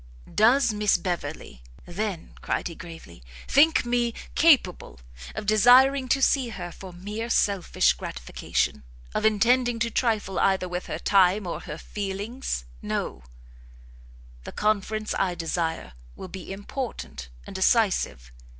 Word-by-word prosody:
"Does 235 +2 +4
Miss 210 -1 +2
Beverley, 155 - -5 0.2
then," 190 -1 -4
cried - - -2
he - - -8
gravely, 165 - -11 0.3
"think 295 -1 +4
me 240 -1 0 0.2
capable 235 - +3 0.4
of - - -5
desiring 255 +6 +5
to 270 +2 +2
see 260 -3 +3
her 180 -5 -6
for 190 +2 -10
mere 210 +6 -6
selfish 190 - +2
gratification? - - -3 0.3
of - - -1
intending 240 +3 +3
to 230 0 -1
trifle 215 -7 0
either 190 -1 +2
with 180 0 -5
her - - -3
time 195 +1 +3
or 175 - -4
her 150 - -7
feelings? 205 - -4 0.2
no; - - -3 1.2
the - - -8
conference 215 0 -1
I 185 -2 0
desire 165 - -3 0.2
will - - -9
be 190 0 -8
important 200 - -6 0.2
and - - -9
decisive. 190 - +1
200 Hz, 130 wpm, -25 LUFS, 175-235 Hz, 1.2 s, desiring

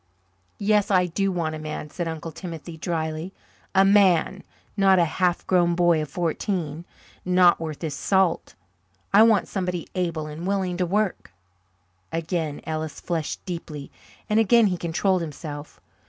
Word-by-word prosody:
"Yes, 210 0 +2
I 185 -2 +4
do 195 +3 -1
want 165 -3 -2
a 155 - -5
man," 150 -1 -6
said 175 -2 -3
Uncle 160 0 -5
Timothy 165 -1 -8
drily. 160 +1 -3 0.4
"A 190 +1 +6
man 195 -2 +4 0.3
not 195 -2 +5
a 175 - +4
half 180 +2 0
grown 175 -2 +3
boy 175 -2 +3
of 150 - -5
fourteen, 170 0 -2 0.4
not 180 -1 +4
worth 160 -1 -6
his 155 -3 -2
salt. 190 +3 +1 0.6
I 205 - +8
want 220 -3 +5
somebody 180 -3 -3
able 170 -4 -2
and 155 +4 -6
willing 190 -2 0
to 180 -1 0
work." 195 - -1 0.8
Again 165 -2 -2
Ellis 155 -1 -4
flushed 165 -3 -3
deeply 160 -5 -6 0.4
and 215 0 +2
again 225 +1 +5
he 190 -3 +1
controlled 175 +2 0
himself. 150 -1 -7
175 Hz, 150 wpm, -24 LUFS, 160-190 Hz, 0.8 s, I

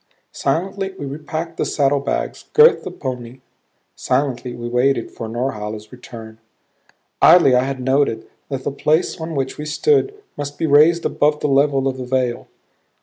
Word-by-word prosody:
Silently 190 +6 -2
we 145 - -6
repacked 155 +4 -5
the - - 0
saddlebags; 140 -1 -1
girthed 455 +2 +6
the - - -5
pony; 125 -1 -7 0.5
silently 125 -2 -1
we 120 0 -6
waited 125 0 +1
for 115 - -7
Norhala's 110 -3 -4
return. 115 -3 -11 0.8
Idly 165 -5 +7
I 125 +1 +3
had 135 -1 -4
noted 130 -3 0 0.2
that 135 -2 -4
the - - -2
place 155 +4 0
on 160 0 -5
which 135 0 -3
we 150 - -4
stood 415 - +1 0.2
must 145 0 -6
be - - -1
raised 155 +3 +4
above 150 0 +1
the - - -1
level 140 -1 +2
of 130 -1 -2
the 130 - -5
vale. 125 -1 -1
135 Hz, 155 wpm, -20 LUFS, 125-150 Hz, 0.8 s, Idly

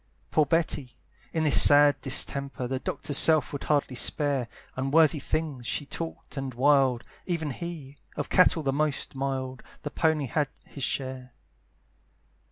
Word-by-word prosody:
Poor 155 -2 +2
Betty! 150 -5 -1 0.3
in 160 - -1
this 150 - +8
sad 145 0 +6
distemper, 135 -1 -1
The 130 +1 -3
doctor's 145 +1 -2
self 155 -4 +3
would 140 - -6
hardly 145 -3 0
spare, 140 -1 0 0.3
Unworthy 145 +3 +2
things 140 -4 -4
she 145 - -3
talked 165 0 -7
and 135 -2 -5
wild, 135 -2 +2 0.2
Even 165 -5 -2
he, 150 -3 -8 0.2
of - - -4
cattle 175 -3 +3
the 135 -1 -1
most 150 -1 -2
mild, 130 -1 -4 0.2
The 145 - -5
pony 160 -3 0
had 145 +3 -1 0.2
his 140 - -8
share. 130 -2 -4
140 Hz, 145 wpm, -26 LUFS, 130-155 Hz, 0.3 s, this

